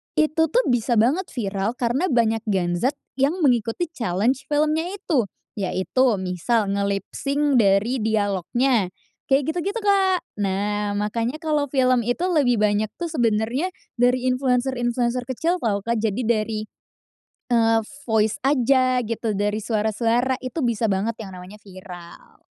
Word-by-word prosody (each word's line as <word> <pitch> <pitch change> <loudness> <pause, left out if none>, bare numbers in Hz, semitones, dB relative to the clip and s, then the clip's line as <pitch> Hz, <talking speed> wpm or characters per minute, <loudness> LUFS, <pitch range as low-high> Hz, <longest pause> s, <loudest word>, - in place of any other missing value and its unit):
itu 310 +1 +1
tuh - - +2
bisa 240 -1 +1
banget 305 +11 +1
viral, 200 -2 -2
karena 250 +7 0
banyak 225 -2 +2
Gen 175 -4 0
Z, 260 +10 +1 0.2
yang 295 +7 +1
mengikuti 250 +4 +1
challenge 230 - -1
filmnya 305 +2 +1
itu. 290 - 0 0.3
Yaitu 195 +6 0 0.2
misal, 190 +4 0
nge-lipsync 275 +8 0
dari 210 +3 +3
dialognya, 215 +1 +1 0.4
kayak 270 +2 +2
gitu-gitu, 400 +6 -2
Kak. 385 -3 +3 0.2
Nah, 205 +1 -1
makanya 230 +6 -2
kalo 300 -3 0
film 255 -2 +3
itu 245 +7 -1
lebih 250 -9 +2
banyak 210 0 +2
tuh, 340 - -2
sebenarnya 240 +3 0 0.3
dari 250 +1 +2
influencer-influencer 250 -1 0
kecil 325 +8 0
tau 200 -3 0
Kak, 235 0 0
jadi 220 +2 -1
dari, 215 -1 0 0.9
eee, 225 -1 +4 0.3
voice 215 -1 +2
aja, 255 -2 +3
gitu. 225 0 -2
Dari 205 +1 0
suara-suara. 225 +3 +1
Itu 255 +5 -4
bisa 230 -1 0
banget, 210 +4 -1
yang 195 -3 -8
namanya 180 +3 -11
viral. 180 -3 -13
235 Hz, 135 wpm, -23 LUFS, 210-270 Hz, 0.9 s, eee